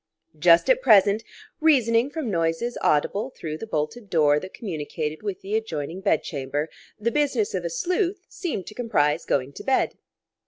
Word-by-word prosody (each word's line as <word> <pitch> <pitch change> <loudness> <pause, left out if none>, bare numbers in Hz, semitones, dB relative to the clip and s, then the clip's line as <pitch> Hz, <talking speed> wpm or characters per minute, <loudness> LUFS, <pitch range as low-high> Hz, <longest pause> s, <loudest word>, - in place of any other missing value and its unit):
Just 170 +1 +6
at - - +4
present, 205 - +5 0.4
reasoning 255 -6 +3
from 285 -6 -3
noises 165 +7 0
audible 200 - +1
through 155 -11 -6
the 225 - -6
bolted 195 +6 -3
door 150 -4 +4
that 185 +4 -9
communicated 155 -5 -4
with 205 -3 -4
the 200 +2 -3
adjoining 175 -5 -3
bed 195 - +2
chamber, 145 +1 -3 0.3
the 230 +3 0
business 295 - +1
of - - -2
a - - -2
sleuth 365 -3 -1
seemed 330 - -4
to - - -9
comprise 160 -10 +1
going 135 +1 0
to - - -9
bed. 270 - +1
200 Hz, 165 wpm, -24 LUFS, 155-250 Hz, 0.4 s, Just